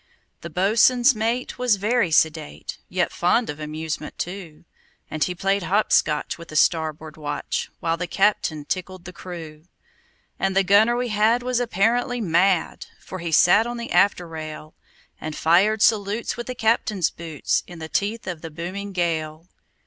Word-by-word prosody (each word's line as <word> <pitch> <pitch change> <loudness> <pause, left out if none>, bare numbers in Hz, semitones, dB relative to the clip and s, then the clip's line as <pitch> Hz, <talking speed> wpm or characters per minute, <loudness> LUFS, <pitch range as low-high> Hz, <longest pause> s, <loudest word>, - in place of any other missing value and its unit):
The 170 - -7
boatswain's 225 - +4
mate 230 +3 -2
was 250 -4 +3
very 210 0 +1
sedate, 160 -1 0
Yet 180 -1 0
fond 200 +6 +1
of 150 - -11
amusement, 155 0 -5
too; 175 -4 -7 0.5
And 155 - 0
he 180 - -2
played 195 +2 0
hop 200 +4 0
scotch 150 +2 +1
with 170 - -10
the 155 - -10
starboard 155 -1 +1
watch, 145 -1 -3
While 165 0 0
the 180 +1 -3
captain 185 -7 +1
tickled 185 +1 -5
the 180 - -9
crew. 165 -4 -9 0.7
And 195 0 0
the 195 - +4
gunner 210 +5 +4
we 245 0 -1
had 220 +3 +2
was 250 -1 0
apparently 240 +3 +1
mad, 180 -2 +1
For 185 - -8
he 170 -1 -4
sat 205 +8 +5
on 240 0 -4
the 235 0 -6
after 180 -3 +3
rail, 155 -1 -8 0.5
And 155 -1 -5
fired 200 +7 +3
salutes 210 +1 +1
with 240 - -6
the 255 - -4
captain's 220 -5 +1
boots, 160 -3 -2
In 175 - -10
the 160 -1 -7
teeth 210 +7 -2
of 175 -4 -5
the 165 - -7
booming 185 +5 -6
gale. 160 -2 -2
185 Hz, 165 wpm, -23 LUFS, 160-215 Hz, 0.7 s, sat